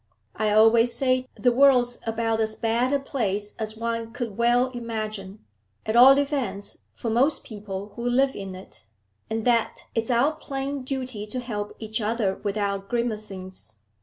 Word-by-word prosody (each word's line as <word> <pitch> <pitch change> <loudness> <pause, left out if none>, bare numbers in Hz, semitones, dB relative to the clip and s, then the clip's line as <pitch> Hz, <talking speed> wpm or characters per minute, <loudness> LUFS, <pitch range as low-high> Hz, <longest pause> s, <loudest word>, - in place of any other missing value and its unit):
I 215 0 0
always 225 +2 +5
say 255 -1 +1
the 245 - +3
world's 245 -2 +4
about 225 0 0
as 220 0 0
bad 235 +3 +1
a 285 - +3
place 210 -7 -2
as 220 0 -4
one 230 0 -3
could 230 -5 -4
well 240 +2 +3
imagine, 215 -4 -5 0.4
at 220 - -1
all 260 +3 +9
events 275 -8 -2 0.2
for 230 - -3
most 265 +7 +2
people 205 -2 -7
who 240 +1 -2
live 265 +2 +2
in 195 -2 -6
it, 185 -10 -13 0.4
and 220 0 -2
that 235 -2 +1
it's 225 +1 -1
our 250 +5 +3
plain 280 -3 -4
duty 255 -5 -4
to 250 +4 -3
help 210 -4 -5
each 220 0 -4
other 210 -3 0
without 200 -1 -2
grimacings. 210 - -4
230 Hz, 160 wpm, -25 LUFS, 210-250 Hz, 0.4 s, all